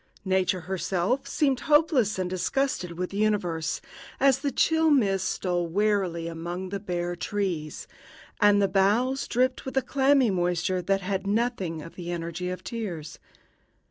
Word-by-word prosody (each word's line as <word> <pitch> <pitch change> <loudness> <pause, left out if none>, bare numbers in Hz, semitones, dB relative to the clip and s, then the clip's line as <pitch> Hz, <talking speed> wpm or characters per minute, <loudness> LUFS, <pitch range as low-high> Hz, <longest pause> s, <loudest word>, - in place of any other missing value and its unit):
Nature 185 -1 +1
herself 190 - -1
seemed 275 -3 +1
hopeless 295 - +3
and 185 -1 -1
disgusted 185 0 -1
with 180 +2 -4
the 200 - -5
universe, 175 -6 0 0.4
as 270 -1 +4
the 280 0 -1
chill 320 +4 +3
mists 195 -9 +2
stole 175 -2 -1
wearily 190 -3 0
among 175 +3 -5
the 200 +1 -3
bare 175 -3 -3
trees, 175 -5 -3 0.5
and 205 -1 +5
the 200 - +3
boughs 210 +8 +2
dripped 255 +2 +1
with 265 0 -5
a - - +5
clammy 270 -4 +3
moisture 180 0 0
that 195 +2 0
had 195 +1 -2
nothing 200 -7 -1
of 165 - -11
the 175 -1 -6
energy 170 +1 -4
of 185 0 -5
tears. 175 -10 -5
190 Hz, 150 wpm, -26 LUFS, 175-240 Hz, 0.5 s, and